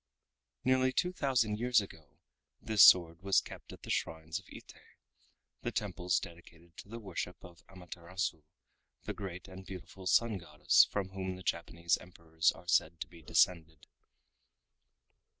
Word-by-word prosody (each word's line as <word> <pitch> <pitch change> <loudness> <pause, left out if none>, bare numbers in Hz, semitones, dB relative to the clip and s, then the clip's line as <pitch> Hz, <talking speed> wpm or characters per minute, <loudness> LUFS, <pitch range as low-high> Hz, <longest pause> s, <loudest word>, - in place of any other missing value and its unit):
Nearly 130 0 +3
two 180 +7 0
thousand 125 -10 +1
years 120 0 +4
ago 80 -7 -10 0.4
this 110 -2 +2
sword 85 -1 +7
was 95 0 +4
kept - - -11
at - - -13
the - - -5
shrines 80 0 -2
of - - -19
Ite, - - -11 0.9
the - - -3
temples 90 +1 -1
dedicated 85 0 -13
to - - -11
the 115 - -7
worship 90 -4 -5
of 85 -2 -14
Amaterasu, 90 -2 -5 0.6
the - - -4
great 95 -2 -7
and 95 0 -10
beautiful 95 0 -9
Sun 110 0 +3
Goddess 75 -3 +4
from 100 -2 -2
whom 95 -1 -4
the 95 - -11
Japanese 85 -2 -1
Emperors 80 -2 0
are 85 +2 -15
said 85 -1 +2
to - - -3
be 85 +1 -15
descended. 80 -2 +1
90 Hz, 150 wpm, -32 LUFS, 85-100 Hz, 0.9 s, sword